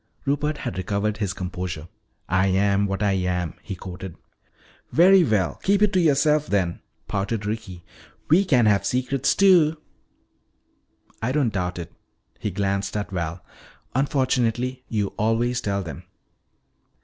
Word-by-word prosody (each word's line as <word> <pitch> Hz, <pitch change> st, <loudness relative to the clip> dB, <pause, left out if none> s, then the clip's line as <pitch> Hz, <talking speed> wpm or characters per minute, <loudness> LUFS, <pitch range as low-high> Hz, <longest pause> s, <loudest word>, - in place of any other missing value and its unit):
Rupert 145 Hz, +2 st, 0 dB
had 95 Hz, -, -4 dB
recovered 105 Hz, +3 st, -1 dB
his 100 Hz, -4 st, -1 dB
composure. 90 Hz, -3 st, -5 dB, 0.4 s
"'I 95 Hz, 0 st, +2 dB
yam 100 Hz, +1 st, +2 dB
what 95 Hz, +2 st, -2 dB
I 100 Hz, -, +3 dB
yam,'" 90 Hz, -3 st, -1 dB
he 95 Hz, -, -6 dB
quoted. 90 Hz, -1 st, -8 dB, 0.8 s
"Very 185 Hz, +3 st, +6 dB
well. 95 Hz, -, 0 dB
Keep 200 Hz, +1 st, +3 dB
it 210 Hz, -1 st, +3 dB
to 185 Hz, -, +3 dB
yourself 150 Hz, -1 st, +3 dB
then," 95 Hz, -4 st, 0 dB, 0.3 s
pouted 105 Hz, +1 st, -2 dB
Ricky. 105 Hz, -5 st, -5 dB, 0.4 s
"We 170 Hz, +6 st, +5 dB
can 130 Hz, -, +3 dB
have 100 Hz, -2 st, +3 dB
secrets 130 Hz, +4 st, 0 dB
too." 175 Hz, -5 st, +5 dB, 1.4 s
"I 120 Hz, -, 0 dB
don't 135 Hz, -5 st, +1 dB
doubt 90 Hz, -1 st, -2 dB
it." 85 Hz, 0 st, -7 dB, 0.5 s
He -, -, -2 dB
glanced 100 Hz, +1 st, -1 dB
at 100 Hz, -1 st, -4 dB
Val. 85 Hz, -1 st, -4 dB, 0.5 s
"Unfortunately 130 Hz, -2 st, 0 dB
you 105 Hz, -3 st, -1 dB
always 115 Hz, +3 st, +1 dB
tell 100 Hz, -1 st, -1 dB
them. 80 Hz, -6 st, -7 dB
105 Hz, 135 wpm, -24 LUFS, 95-130 Hz, 1.4 s, Very